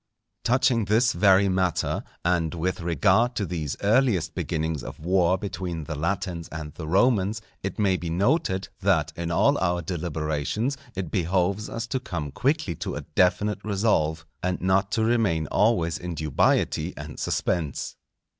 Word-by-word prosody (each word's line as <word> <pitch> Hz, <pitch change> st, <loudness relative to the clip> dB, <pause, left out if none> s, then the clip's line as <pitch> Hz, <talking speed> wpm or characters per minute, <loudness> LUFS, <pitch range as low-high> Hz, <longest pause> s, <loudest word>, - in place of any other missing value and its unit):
Touching 120 Hz, -2 st, +2 dB
this 110 Hz, +5 st, +3 dB
very 95 Hz, +2 st, +5 dB
matter, 95 Hz, -2 st, 0 dB, 0.2 s
and 85 Hz, -2 st, +1 dB
with 90 Hz, +3 st, -2 dB
regard 100 Hz, +8 st, +2 dB
to 100 Hz, -, -1 dB
these 80 Hz, -6 st, -3 dB
earliest 100 Hz, -, +2 dB
beginnings 80 Hz, -4 st, -2 dB
of -, -, -8 dB
war 90 Hz, +2 st, +2 dB
between 90 Hz, -4 st, -4 dB
the 75 Hz, -, -5 dB
Latins 85 Hz, +2 st, -2 dB
and 80 Hz, -2 st, -6 dB
the 80 Hz, -, -7 dB
Romans, 100 Hz, +3 st, +2 dB, 0.2 s
it 95 Hz, -1 st, -4 dB
may 95 Hz, -3 st, +2 dB
be 85 Hz, -, -5 dB
noted, 95 Hz, -, +1 dB
that 95 Hz, -6 st, +1 dB
in 85 Hz, 0 st, -3 dB
all 85 Hz, -, +3 dB
our 85 Hz, -1 st, 0 dB
deliberations 80 Hz, -, -2 dB, 0.2 s
it 90 Hz, -4 st, -4 dB
behoves 95 Hz, +3 st, 0 dB
us 115 Hz, +1 st, -4 dB
to 125 Hz, +3 st, -2 dB
come 85 Hz, -, -5 dB
quickly 140 Hz, -, 0 dB
to -, -, -5 dB
a -, -, -4 dB
definite 95 Hz, +4 st, +1 dB
resolve, 95 Hz, -7 st, +1 dB, 0.2 s
and 90 Hz, 0 st, -1 dB
not 95 Hz, +2 st, +1 dB
to 110 Hz, -, +2 dB
remain 110 Hz, -9 st, +2 dB
always 85 Hz, -6 st, +2 dB
in 90 Hz, -1 st, -5 dB
dubiety 75 Hz, -3 st, +1 dB
and -, -, -8 dB
suspense. 80 Hz, -6 st, -2 dB
90 Hz, 155 wpm, -25 LUFS, 85-105 Hz, 0.2 s, very